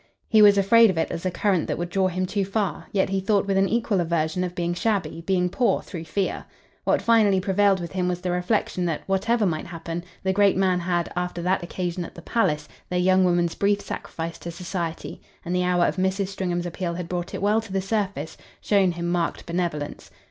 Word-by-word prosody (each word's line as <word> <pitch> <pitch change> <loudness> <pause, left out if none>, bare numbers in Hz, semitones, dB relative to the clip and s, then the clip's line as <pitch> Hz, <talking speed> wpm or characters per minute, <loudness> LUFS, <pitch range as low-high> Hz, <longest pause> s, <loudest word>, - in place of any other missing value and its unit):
He 220 -1 +5
was 205 -1 +7
afraid 225 +3 +6
of 185 - -1
it 160 - 0
as 165 +3 -3
a - - +2
current 185 -1 0
that - - -2
would 175 0 -3
draw 190 0 +2
him 185 0 -1
too 200 +2 -1
far; 195 0 -2
yet 190 -2 +1
he 195 0 0
thought 200 +1 +1
with 195 -1 0
an 195 0 +3
equal 220 -4 +1
aversion 165 +1 0
of 180 -1 -4
being 175 -1 -1
shabby, 195 -2 -1
being 180 -2 +2
poor, 210 +2 +1
through 165 -2 -7
fear. 190 +4 -2 0.4
What - - +2
finally 215 -4 +4
prevailed 195 +1 +2
with 170 -1 -6
him 185 -1 -1
was 180 -1 -1
the 180 -1 -1
reflexion 180 0 0
that, 165 -3 -2
whatever 205 +4 +1
might 160 -4 -1
happen, 170 0 -5 0.2
the 190 0 +1
great 200 -1 +4
man 185 -2 +2
had, 175 -1 -1
after 180 -1 -3
that 185 +2 +1
occasion 175 0 -3
at - - -10
the 170 - -11
palace, 150 -11 0 0.2
their 180 - -1
young 185 +1 +4
woman's 175 -2 +2
brief 200 0 +1
sacrifice 165 -4 -6
to 170 - -7
society 170 -1 -5 0.2
and 175 - -2
the 180 - +2
hour 180 -1 +3
of - - -1
Mrs. 190 +1 0
Stringham's 180 -3 -2
appeal 175 0 -3
had 175 -1 -5
brought 175 0 -4
it - - -5
well 210 +2 +3
to 220 -3 -12
the 195 - 0
surface 195 -6 -2 0.2
shown 195 -4 +2
him 170 0 -4
marked 175 -1 -1
benevolence. 170 -4 -3
185 Hz, 220 wpm, -24 LUFS, 175-195 Hz, 0.4 s, was